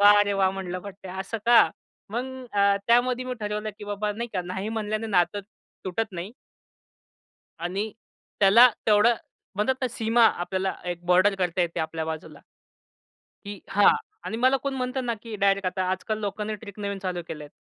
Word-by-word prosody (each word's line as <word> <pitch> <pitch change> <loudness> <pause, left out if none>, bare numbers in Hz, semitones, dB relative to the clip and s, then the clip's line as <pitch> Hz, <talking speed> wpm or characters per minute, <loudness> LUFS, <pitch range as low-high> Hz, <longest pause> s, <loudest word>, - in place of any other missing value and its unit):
वा 205 0 +9
रे 205 - 0
वाह! 195 -1 +3
म्हणलं 185 -1 -4
पट्ट्या 190 -1 -9
असं 195 +4 -4
का?" 235 -1 +7 0.4
मग 240 +3 -2 0.3
अ, 200 0 +4
त्यामध्ये 245 +1 +3
मी 255 - -3
ठरवलं 210 +1 -3
की 210 - -8
बाबा 205 +1 -2
नाही 235 +3 -4
का, 185 - -1
नाही 190 +3 -4
म्हणल्याने 220 0 -2
नातं 185 0 +2 0.4
तुटत 205 +3 -2
नाही 180 +4 -6 1.3
आणि 190 +6 -2 0.5
त्याला 215 +5 +8 0.2
तेवढं, 215 +2 +5 0.4
म्हणतात 210 +7 +1
ना 255 - 0
सीमा 230 +1 +3
आपल्याला 190 -1 -1 0.2
एक 175 0 -6
बॉर्डर 185 +3 +5
करता 180 0 0
येते 170 -1 0
आपल्या 160 0 -3
बाजूला. 160 0 -6 1.1
की 205 -1 -7
हां 205 0 +4 0.4
आणि 220 - -3
मला 255 +3 +4
कोण 275 -1 -2
म्हणतं 255 0 -2
ना 235 - 0
की 230 -2 -7
डायरेक्ट 195 -1 +2
आता, 185 +1 -1
आजकाल 215 +4 -2
लोकांनी 210 +1 -3
ट्रिक 205 -2 -11
नवीन 200 -1 -3
चालू 180 -2 -2
केलंय. 150 -2 -7
205 Hz, 170 wpm, -26 LUFS, 185-225 Hz, 1.3 s, वा